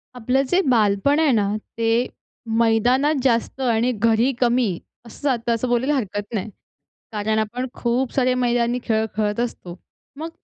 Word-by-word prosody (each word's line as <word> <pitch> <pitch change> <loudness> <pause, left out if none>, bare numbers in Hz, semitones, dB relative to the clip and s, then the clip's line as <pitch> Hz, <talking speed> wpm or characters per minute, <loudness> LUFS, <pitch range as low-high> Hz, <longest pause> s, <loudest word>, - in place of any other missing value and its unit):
आपलं 250 +3 +1
जे 370 +2 +3
बालपण 220 +5 +3
आहे 315 -3 +3
ना, 205 -1 +1 0.3
ते 230 0 0 0.7
मैदानात 245 +6 +3
जास्त 240 +1 0
आणि 240 -1 +2 0.2
घरी 230 +4 +3
कमी 245 -1 +3 0.4
असं 230 - -13
जातं 240 -4 +1
असं 230 +3 -2
बोलायला 255 +5 +1
हरकत 205 -3 -4
नाही. 215 0 -2 0.6
कारण 215 0 0
आपण 240 +4 -2 0.2
खूप 245 +2 0
सारे 255 -1 +2
मैदानी 240 0 +1
खेळ 220 -1 +1
खेळत 210 0 -1
असतो. 205 -7 -4 0.4
मग 320 +1 -4
235 Hz, 150 wpm, -22 LUFS, 220-255 Hz, 0.7 s, जे